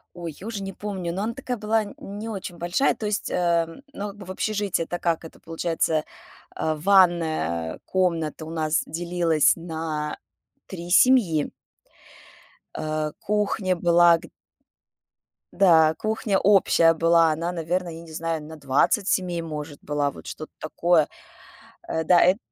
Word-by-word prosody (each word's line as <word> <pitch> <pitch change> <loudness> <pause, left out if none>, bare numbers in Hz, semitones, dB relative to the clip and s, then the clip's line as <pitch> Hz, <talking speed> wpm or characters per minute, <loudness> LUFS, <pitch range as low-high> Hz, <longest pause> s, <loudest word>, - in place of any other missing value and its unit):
Ой, 170 -2 -6
я 195 - -10
уже 220 -3 -4
не 195 0 -5
помню, 190 -4 -4
но 190 +4 -3
она 230 - -2
такая 250 -1 -4
была, 215 +1 +1
н 205 - -9 0.3
не 225 +2 -5
очень 190 -4 -6
большая, 175 +11 +1
то 215 - -5
есть, 210 0 -2
ам, 170 +3 0
ну, 205 +1 -4
как 200 - -12
бы, 195 - -10
в - - -5
общежитии, 205 -3 -1
это 175 +1 -5
как 165 -1 -1
это 160 - -12
получается, 165 -1 -1 0.5
а, 155 0 -1
ванная 160 - +2
комната 165 -4 -1
у 160 - -8
нас 155 -1 0
делилась 170 -2 +2
на 160 -2 -4 0.5
3 175 -2 -8
семьи. 195 - +4 1.3
А 155 -1 -2
кухня 205 -2 0
была 170 0 +5
г - - -13 1.3
Да, 165 -5 +5
кухня 215 -2 0
общая 175 -5 +4
была, 165 0 +4
она, 165 +3 -2
наверно, 175 +1 -2
я 165 0 -8
не 165 -1 -13
знаю, 165 0 -3
на 160 +1 -9
20 145 - +1
семей, 175 -4 0
может, 150 -2 -6
была, 145 -1 0
вот - - -12
что-то 155 - -8
такое. 160 0 +2 0.8
Э, 160 - -1
да, 175 +2 +5
эт 185 +2 +4
170 Hz, 155 wpm, -24 LUFS, 160-195 Hz, 1.3 s, была